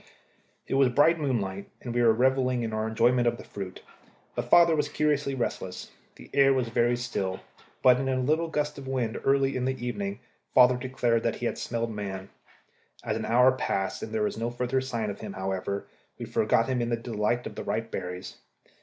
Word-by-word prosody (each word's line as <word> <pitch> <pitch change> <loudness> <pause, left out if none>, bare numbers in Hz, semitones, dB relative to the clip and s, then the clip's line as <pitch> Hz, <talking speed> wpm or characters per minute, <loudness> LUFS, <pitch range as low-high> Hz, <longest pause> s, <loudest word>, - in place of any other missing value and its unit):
It - - -4
was 135 -1 +4
bright 155 +6 +4
moonlight, 100 -9 -2
and 120 - -6
we 120 - +1
were 115 -1 +6
revelling 130 +1 +2
in 110 -1 -3
our 110 0 -1
enjoyment 120 +2 +3
of 120 - +1
the - - -10
fruit, 95 -2 -8 0.5
but - - -4
father 170 -1 +6
was 150 -1 0
curiously 145 -3 0
restless. 95 -7 -4 0.2
The - - -14
air 135 -1 +5
was 125 -3 0
very 120 +1 +2
still, 100 -6 -3 0.4
but 125 -1 +6
in 135 0 -1
a 130 -1 +1
little 155 +6 +1
gust 150 -2 -2
of 135 - -9
wind 125 -4 -2
early 135 0 +2
in 130 -1 -1
the 130 0 0
evening 100 -5 -4 0.4
father 125 0 +7
declared 125 -2 0
that 115 -1 0
he 120 - -5
had - - -2
smelled 115 -1 -2
man. 95 -2 -5 0.7
As - - -1
an - - -3
hour 125 +3 +5
passed 95 -6 -2
and 110 - -6
there 110 -1 0
was 105 - -2
no 115 +1 -1
further 125 +2 -1
sign 115 -5 -2
of - - -9
him, 105 -2 -7
however, 95 +1 -3 0.3
we - - -5
forgot 115 - +2
him 130 -2 0
in 120 - -1
the 120 - 0
delight 115 +1 -1
of - - -6
the - - -6
ripe 115 0 -3
berries. 90 +1 -6
120 Hz, 205 wpm, -27 LUFS, 110-130 Hz, 0.7 s, father